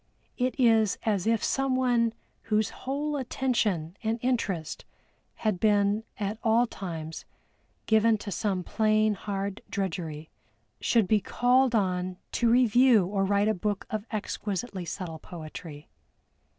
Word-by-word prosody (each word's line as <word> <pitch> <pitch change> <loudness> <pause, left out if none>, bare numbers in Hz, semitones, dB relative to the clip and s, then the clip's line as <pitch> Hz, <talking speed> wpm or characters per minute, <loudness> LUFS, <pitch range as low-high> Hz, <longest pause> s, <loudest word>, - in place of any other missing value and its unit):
It 255 +3 -1
is 225 -4 +4
as 210 -4 0
if 225 -1 +2
someone 255 -4 +1 0.3
whose 215 -1 +1
whole 290 +3 -3
attention 225 - -1
and 225 0 0
interest 200 -10 -1 0.5
had 215 -5 -1
been 205 0 +2 0.2
at 210 +1 -2
all 230 +2 +4
times 165 -7 -6 0.6
given 220 0 +4
to 205 -1 -7
some 190 -1 -1
plain 215 +1 +2
hard 200 +1 -4
drudgery, 165 -5 -4 0.5
should 225 -5 +2
be 210 +1 +3
called 250 +2 +2
on 185 -3 0
to 235 - +2
review 240 -3 +5
or 195 +1 0
write 200 +1 +2
a 220 - +3
book 205 +1 -2
of 215 0 -3
exquisitely 205 -2 -4
subtle 165 -1 -5
poetry. 155 -3 -9
210 Hz, 125 wpm, -28 LUFS, 190-230 Hz, 0.6 s, review